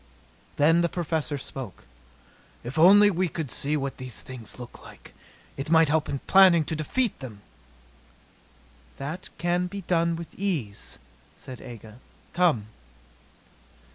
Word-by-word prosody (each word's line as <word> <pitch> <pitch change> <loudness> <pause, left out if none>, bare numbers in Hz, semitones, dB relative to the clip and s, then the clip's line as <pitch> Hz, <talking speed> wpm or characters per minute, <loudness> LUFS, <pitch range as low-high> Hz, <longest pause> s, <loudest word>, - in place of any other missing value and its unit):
Then 165 +4 +4
the 170 - +1
Professor 160 -4 -2
spoke: 130 -5 -8 0.8
"If 130 +6 -4
only 205 +5 +8
we 185 0 0
could 155 -4 -5
see 150 +2 -1
what 140 -1 -4
these 130 -3 -6
things 125 -5 -9
look 125 -1 -10
like! - - -14 0.4
It 135 +2 -5
might 160 -2 +5
help 155 0 +1
in 140 - -1
planning 185 -4 +6
to 160 - -2
defeat 220 - -1
them." 115 -7 -9 1.6
"That 155 +7 -5
can 175 +1 0
be 200 +2 -6
done 170 -2 +1
with 165 0 -8
ease," 125 - -3 0.4
said 130 -1 -10
Aga. 115 -1 -11 0.3
"Come." 170 -12 +2
155 Hz, 135 wpm, -26 LUFS, 130-175 Hz, 1.6 s, only